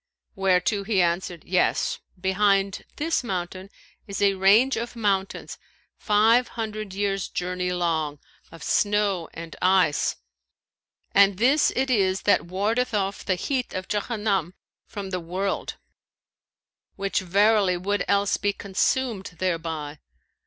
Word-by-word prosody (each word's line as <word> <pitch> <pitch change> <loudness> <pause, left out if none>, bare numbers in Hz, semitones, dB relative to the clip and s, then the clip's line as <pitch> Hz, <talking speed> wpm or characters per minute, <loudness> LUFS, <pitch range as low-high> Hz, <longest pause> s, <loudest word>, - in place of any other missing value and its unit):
whereto 195 +1 +1
he 200 -1 0
answered, 175 -1 0
'Yes, 180 0 +1 0.2
behind 195 +1 +1
this 320 -2 0
mountain 185 -2 -4 0.4
is 200 - -5
a 200 -1 +4
range 205 +8 +4
of 235 +1 -4
mountains 195 -4 -2 0.4
five 225 +4 +3
hundred 215 -2 -4
years' 195 -2 -1
journey 180 0 -2
long, 160 -4 -1 0.3
of 165 -2 -11
snow 205 -4 +1
and 165 -1 -9
ice, 185 -5 +3 1.0
and 200 -1 +5
this 265 +8 +3
it 265 0 0
is 195 -4 +1
that 205 - +3
wardeth 215 +6 0
off 195 -1 -1
the 185 - 0
heat 255 +7 -2
of 185 -1 -4
Jahannam 205 -4 -1 0.3
from 195 -2 -7
the 185 - -1
world, 185 +4 -3 1.2
which 195 0 -1
verily 195 0 +3
would 200 +3 -1
else 200 0 +2
be 205 0 0
consumed 200 0 -1
thereby. 160 -4 -3
195 Hz, 125 wpm, -25 LUFS, 180-210 Hz, 1.2 s, and